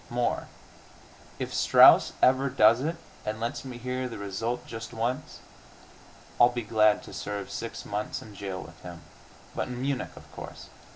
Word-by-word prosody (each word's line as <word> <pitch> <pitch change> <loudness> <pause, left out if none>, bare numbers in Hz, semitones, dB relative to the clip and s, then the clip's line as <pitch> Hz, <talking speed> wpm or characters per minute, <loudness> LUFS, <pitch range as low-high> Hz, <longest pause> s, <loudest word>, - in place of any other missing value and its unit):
More, 120 0 -1 0.9
if - - -4
Strauss - - +7
ever 130 +2 +4
does 115 -2 +5
it 160 +4 -1 0.3
and 110 +1 -3
lets 120 +6 -3
me 130 -2 -7
hear 125 +1 -3
the 115 - -7
result 100 +5 -3
just 115 +1 -7
once, 125 +6 -3 1.0
I'll 120 - +8
be 120 -1 -4
glad 105 0 +3
to - - -11
serve 100 -1 -5
six 115 - -5
months 105 +1 -3
in 110 - -12
jail 95 -2 -5
with 85 0 -14
him.... 85 -1 -9 0.5
But - - -2
in 125 -1 -6
Munich, 135 0 -2
of - - -12
course! - - -9
115 Hz, 165 wpm, -28 LUFS, 105-125 Hz, 1.0 s, I'll